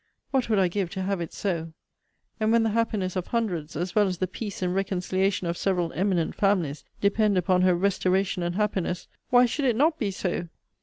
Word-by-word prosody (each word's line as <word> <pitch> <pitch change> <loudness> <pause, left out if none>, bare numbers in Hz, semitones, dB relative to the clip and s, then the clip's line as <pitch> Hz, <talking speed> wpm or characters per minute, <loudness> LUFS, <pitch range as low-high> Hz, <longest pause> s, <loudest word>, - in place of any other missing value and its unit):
What 265 -3 +1
would 215 - +3
I 190 -2 +4
give 185 0 -2
to 190 -1 -3
have 195 -1 -1
it 170 - -5
so! 165 -5 -3 0.7
And 215 0 +2
when 230 0 +4
the 225 - +1
happiness 210 -4 0
of 185 -2 -2
hundreds, 180 -10 -2
as 175 +4 -3
well 210 -2 +4
as 185 -1 -2
the 185 - 0
peace 195 +1 -6
and 180 0 0
reconciliation 190 0 0
of 170 0 -2
several 180 -4 0
eminent 180 -3 0
families, 180 -8 0 0.2
depend 205 0 +3
upon 180 0 +2
her 185 -1 +4
restoration 190 0 +1
and 175 0 -2
happiness, 190 -4 -1 0.2
why 245 0 +6
should 275 +4 -1
it 245 -3 +3
not 310 +6 +2
be 210 - 0
so? 180 -2 -3
190 Hz, 205 wpm, -26 LUFS, 180-210 Hz, 0.7 s, why